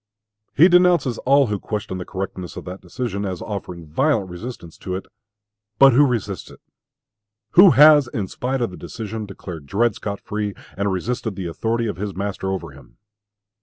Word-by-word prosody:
He 165 +5 +7
denounces 175 -9 +4
all 140 +1 +6
who 105 -4 -2
question 105 -3 -4
the 90 - -5
correctness 95 -2 -6
of - - -7
that 90 +1 -7
decision, 100 +2 -4
as 95 -3 -3
offering 90 -5 -6
violent 100 - 0
resistance 90 -3 -8
to 90 - -4
it. 95 - -5 0.7
But 135 +1 +7
who 145 +4 +6
resists 105 -6 -3
it? - - -15 0.9
Who 185 +2 +8
has, 150 -2 +8
in 110 -5 -3
spite 130 +6 -3
of 115 - -1
the 90 - -10
decision, 110 -1 -6
declared 85 -6 -9
Dred 115 +8 +2
Scott 100 -3 -5
free, 105 -1 -4 0.2
and 100 +1 -1
resisted 110 +3 -3
the 95 -2 -5
authority 115 +7 -1
of 105 -7 -3
his 100 -1 -4
master 95 0 -3
over 95 -5 -4
him? 70 +1 -17
105 Hz, 175 wpm, -21 LUFS, 95-125 Hz, 0.9 s, Who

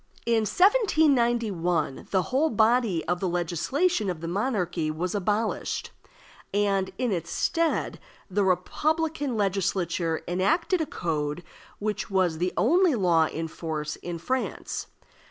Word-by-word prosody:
In 230 -2 +2
1791, 235 - +2
the 190 - +2
whole 280 - +1
body 220 - +2
of 175 +1 -1
the 185 - -1
legislation 195 - 0
of 175 -3 -3
the 165 - -5
monarchy 180 -5 -1
was 170 +4 -2
abolished, 210 +2 -1 0.6
and 195 -1 +1
in 250 -3 0
its 175 -4 -3
stead 335 -1 0 0.3
the 200 +1 0
republican 295 - 0
Legislature 180 -4 0
enacted 315 - +1
a 315 - -1
code 155 - -2 0.3
which 210 +1 -3
was 185 -5 +1
the 180 +1 0
only 340 - +4
law 170 -6 +3
in 165 +1 -4
force 155 -2 -4
in 175 -1 -5
France. 255 +10 -3
195 Hz, 125 wpm, -26 LUFS, 175-250 Hz, 0.6 s, only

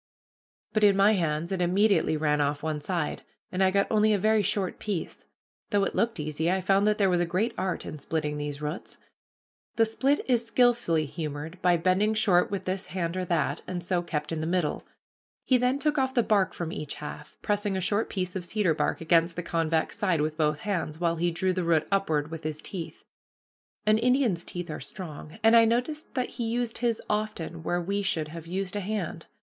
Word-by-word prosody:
But 215 - +2
in 200 -1 +6
my 200 +2 +6
hands 165 -3 0
it 190 -2 -1
immediately 190 -2 +3
ran 150 -1 +1
off 145 0 -1
one 155 -1 -2
side, 170 -1 -2 0.3
and 185 +1 +1
I 190 - +5
got 200 +1 +2
only 215 0 +4
a - - +3
very 215 +2 +3
short 200 -1 -1
piece. 200 -6 -4 0.4
Though 205 -1 +2
it - - -1
looked 230 -5 0
easy, 155 +2 -1
I 190 +1 +2
found 195 +2 +3
that 210 0 +3
there 200 - +3
was 175 -2 +2
a - - +2
great 185 +8 0
art 185 -1 -2
in 155 - -7
splitting 150 0 -2
these 145 0 -5
roots. 150 +4 -5 0.8
The 225 - +4
split 270 +6 +1
is 240 -3 +3
skillfully 230 -9 +2
humored 150 +2 -6
by 175 -1 +4
bending 185 +5 +2
short 185 -5 +3
with 200 -1 -4
this 185 0 -2
hand 170 -2 -3
or 185 0 -2
that, 165 -3 0
and 175 -1 -4
so 175 0 0
kept 150 -3 -3
in 160 -1 -2
the 160 - -2
middle. 175 -3 -1 0.6
He 255 -2 +4
then 250 +2 +2
took 295 0 +1
off 260 0 0
the 240 - +4
bark 200 -4 +2
from 170 -2 -4
each 150 -2 -5
half, 150 0 -9
pressing 205 -1 0
a - - 0
short 205 +4 0
piece 185 -2 -3
of 185 - -3
cedar 185 -2 +1
bark 155 - -1
against 165 +1 +3
the 175 - -4
convex 165 +2 0
side 185 -7 +2
with 155 +1 -1
both 150 -1 0
hands, 170 -7 -2
while 170 -1 +1
he 175 +2 +1
drew 185 +2 0
the 185 0 -1
root 160 -2 +2
upward 160 -6 +1
with 165 0 -6
his 155 0 -3
teeth. 170 -1 -7 0.8
An 215 +1 +4
Indian's 245 -7 +2
teeth 175 -2 -5
are - - -5
strong, 155 -2 -8
and 225 +1 +6
I 230 - +8
noticed 250 +7 -1
that 255 -2 0
he 235 - -4
used 235 0 -1
his 235 -2 0
often 170 -6 -2
where 175 +2 -1
we 200 +4 -1
should 160 -6 -1
have 165 +1 -9
used 190 +2 -3
a - - 0
hand. 190 -5 -4
185 Hz, 215 wpm, -27 LUFS, 160-210 Hz, 0.8 s, I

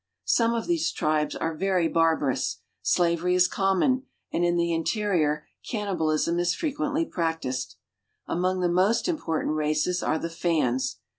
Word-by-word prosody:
Some 230 - +3
of 230 - -2
these 165 -1 +1
tribes 155 -1 0
are 165 - -2
very 185 0 +1
barbarous. 160 -5 +1 0.2
Slavery 175 +1 +2
is! 180 0 +5
common, 195 +9 +1 0.3
and 170 - +1
in 175 0 +2
the 170 0 +1
interior 165 -4 0 0.2
cannibalism 170 -6 0
is 175 +1 +1
frequently 305 0 -1
I - - -17
practiced. 160 -7 -2 0.5
Among 185 +2 0
the 180 - +2
most 185 - +2
important 160 - -1
races 155 +4 0
are 155 - 0
the 165 +1 -4
Fans. 130 -7 0
170 Hz, 145 wpm, -26 LUFS, 155-190 Hz, 0.5 s, is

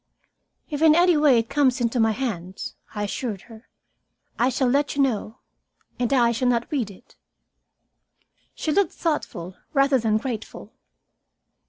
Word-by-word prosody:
"If 295 -2 -4
in 315 -1 +6
any 350 0 +5
way 295 -4 +5
it 225 0 0
comes 270 -2 +2
into 240 0 0
my 225 -1 +4
hands," 195 -6 -4 0.2
I 210 - -2
assured 205 -1 -4
her, 225 0 -15 0.7
"I 245 - +3
shall 260 0 0
let 280 +3 +1
you 280 - +2
know. 225 -2 -2 0.6
And 245 0 0
I 240 -3 +4
shall 245 +2 -1
not 240 -1 0
read 255 -8 -1
it." 205 +7 -17 1.4
She 310 - -2
looked 395 +5 +2
thoughtful 185 - -3 0.2
rather 275 -1 +4
than 220 -2 +1
grateful. 225 -2 -6
245 Hz, 150 wpm, -24 LUFS, 220-280 Hz, 1.4 s, in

